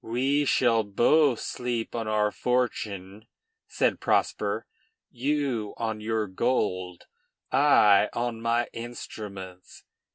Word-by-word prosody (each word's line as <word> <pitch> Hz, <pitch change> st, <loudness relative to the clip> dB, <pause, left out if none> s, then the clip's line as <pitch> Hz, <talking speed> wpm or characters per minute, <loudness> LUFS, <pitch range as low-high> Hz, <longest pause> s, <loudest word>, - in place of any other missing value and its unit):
"We 135 Hz, +5 st, +1 dB
shall 115 Hz, -4 st, +3 dB
both 120 Hz, +6 st, +3 dB
sleep 120 Hz, -2 st, -3 dB
on 115 Hz, -2 st, -3 dB
our 105 Hz, -1 st, +1 dB
fortune," 105 Hz, -5 st, -2 dB, 0.4 s
said -, -, 0 dB
Prosper, -, -, 0 dB, 0.5 s
"you, 130 Hz, -4 st, -1 dB
on 110 Hz, -2 st, -3 dB
your 110 Hz, 0 st, -1 dB
gold; 95 Hz, -4 st, -1 dB, 0.5 s
I, 115 Hz, -7 st, +5 dB
on 120 Hz, -1 st, -3 dB
my 115 Hz, +1 st, +1 dB
instruments. 100 Hz, -6 st, -9 dB
115 Hz, 100 wpm, -27 LUFS, 105-125 Hz, 0.5 s, I